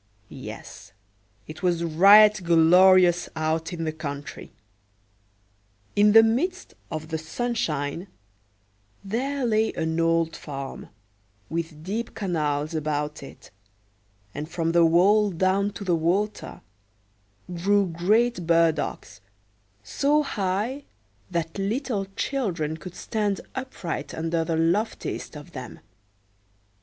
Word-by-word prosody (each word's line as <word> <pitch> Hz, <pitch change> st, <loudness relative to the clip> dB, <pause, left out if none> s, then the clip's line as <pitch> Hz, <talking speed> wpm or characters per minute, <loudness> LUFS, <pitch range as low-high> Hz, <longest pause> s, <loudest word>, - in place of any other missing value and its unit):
Yes, -, -, -10 dB, 0.5 s
it 155 Hz, 0 st, -10 dB
was 175 Hz, -2 st, +1 dB
right 200 Hz, +6 st, +7 dB
glorious 175 Hz, +1 st, +5 dB
out 160 Hz, +1 st, -1 dB
in 170 Hz, -2 st, -4 dB
the 160 Hz, -, -1 dB
country. 145 Hz, -2 st, -7 dB, 1.4 s
In 205 Hz, 0 st, +5 dB
the 225 Hz, 0 st, +9 dB
midst 345 Hz, +12 st, -1 dB, 0.2 s
of 155 Hz, 0 st, -6 dB
the 160 Hz, -1 st, -2 dB
sunshine 160 Hz, -, -3 dB, 1.0 s
there 255 Hz, +7 st, -2 dB
lay 220 Hz, -1 st, +2 dB
an 160 Hz, 0 st, -2 dB
old 165 Hz, -1 st, +1 dB
farm, 135 Hz, -2 st, -7 dB, 0.6 s
with 160 Hz, -2 st, -4 dB
deep 215 Hz, +6 st, -4 dB
canals 155 Hz, -6 st, -1 dB
about 150 Hz, -1 st, -2 dB
it, 135 Hz, -, -13 dB, 0.8 s
and 150 Hz, +2 st, -6 dB
from 165 Hz, -1 st, -1 dB
the 170 Hz, 0 st, +4 dB
wall 200 Hz, +6 st, +4 dB
down 190 Hz, +3 st, +1 dB
to 205 Hz, -, -7 dB
the 180 Hz, -3 st, +1 dB
water 190 Hz, +6 st, -1 dB, 0.9 s
grew 200 Hz, +4 st, +2 dB
great 185 Hz, +3 st, +1 dB
burdocks, 165 Hz, -, 0 dB, 0.6 s
so 285 Hz, -, +1 dB
high 215 Hz, +4 st, -2 dB, 0.5 s
that 170 Hz, 0 st, -3 dB
little 210 Hz, 0 st, -2 dB
children 180 Hz, -, -2 dB
could 180 Hz, +2 st, -10 dB
stand 205 Hz, 0 st, -2 dB
upright 175 Hz, -, -5 dB
under 165 Hz, +1 st, -1 dB
the 160 Hz, 0 st, -1 dB
loftiest 170 Hz, -1 st, -1 dB
of 150 Hz, +4 st, -12 dB
them. 130 Hz, -5 st, -8 dB
175 Hz, 110 wpm, -25 LUFS, 160-210 Hz, 1.4 s, the